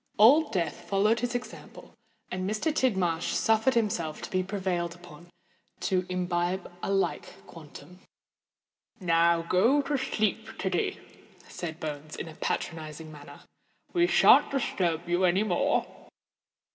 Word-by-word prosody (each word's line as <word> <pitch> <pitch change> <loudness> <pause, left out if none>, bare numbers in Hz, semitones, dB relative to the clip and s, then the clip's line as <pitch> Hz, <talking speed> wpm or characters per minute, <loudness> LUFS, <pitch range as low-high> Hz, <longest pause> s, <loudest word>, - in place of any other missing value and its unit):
Old 285 +9 +6
Death 170 -7 -3
followed 210 +4 +2
his 245 +1 -2
example; 245 - -8 0.4
and 185 +1 -2
Mr. 215 +9 -1
Tidmarsh 190 - +1
suffered 225 +4 +2
himself 180 -9 -1
to - - -7
be 185 - +1
prevailed 185 -3 -2
upon 175 -1 -15 0.5
to 185 -1 0
imbibe 180 0 -2
a - - -2
like 195 -1 -2
quantum. 170 +3 -13 1.0
"Now, 170 -2 +3
go 225 +12 +3
to 290 0 -1
sleep, 220 -3 -2
Tiddy," 185 -2 -1 0.5
said 165 -2 -6
Bones, 150 0 -6
in - - -6
a 160 - -9
patronising 155 0 -4
manner. 145 -1 -12 0.5
"We 345 -1 +3
shan't - - +6
disturb 175 - -1
you 175 +2 +1
any 185 +3 +3
more." 180 -5 +1
180 Hz, 130 wpm, -28 LUFS, 170-215 Hz, 1.0 s, Old